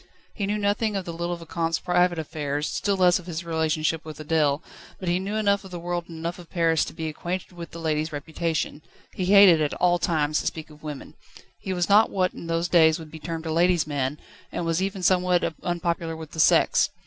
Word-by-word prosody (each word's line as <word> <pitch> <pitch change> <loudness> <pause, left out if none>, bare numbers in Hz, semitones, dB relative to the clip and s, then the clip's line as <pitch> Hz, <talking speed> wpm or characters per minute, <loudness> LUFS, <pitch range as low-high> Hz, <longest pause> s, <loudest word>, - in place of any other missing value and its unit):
He 200 -3 -3
knew 210 +1 0
nothing 210 +1 0
of 190 -2 -2
the 170 - -5
little 170 +1 -2
Vicomte's 165 -1 -2
private 180 -1 +2
affairs, 150 -2 -3
still 200 -1 -1
less 180 -1 +4
of 180 - -13
his 170 -1 -4
relationship 160 -1 0
with 155 -1 -9
Adèle, 155 -1 +1 0.4
but 185 - -6
he 175 +1 +2
knew 200 +3 -3
enough 200 -2 +2
of 190 - -10
the 175 -1 -6
world 175 0 -3
and 165 - -8
enough 170 +2 -4
of 175 - -13
Paris 165 -3 +2
to - - -8
be 160 - -4
acquainted 175 +5 -4
with 170 -1 -9
the - - -10
lady's 155 -1 -1
reputation. 155 0 -3 0.3
He 185 - -2
hated 190 -4 +7
at 150 - 0
all 175 -1 +2
times 155 -3 +1
to - - -3
speak 155 -1 -5
of 150 0 -16
women. 150 -3 -7 0.5
He 190 - -5
was 175 -2 0
not 210 +2 +5
what 185 -2 0
in 170 - -9
those 165 +1 0
days 160 -2 +5
would 160 -2 -11
be 160 - -9
termed 165 0 -5
a 160 - -2
ladies' 170 0 +3
man, 145 -1 -2 0.3
and 175 - -3
was 165 +2 0
even 195 -1 -3
somewhat 180 -2 +2
unpopular 170 -2 -2
with 160 -2 -9
the 160 - -7
sex. - - +4
170 Hz, 225 wpm, -25 LUFS, 160-180 Hz, 0.5 s, hated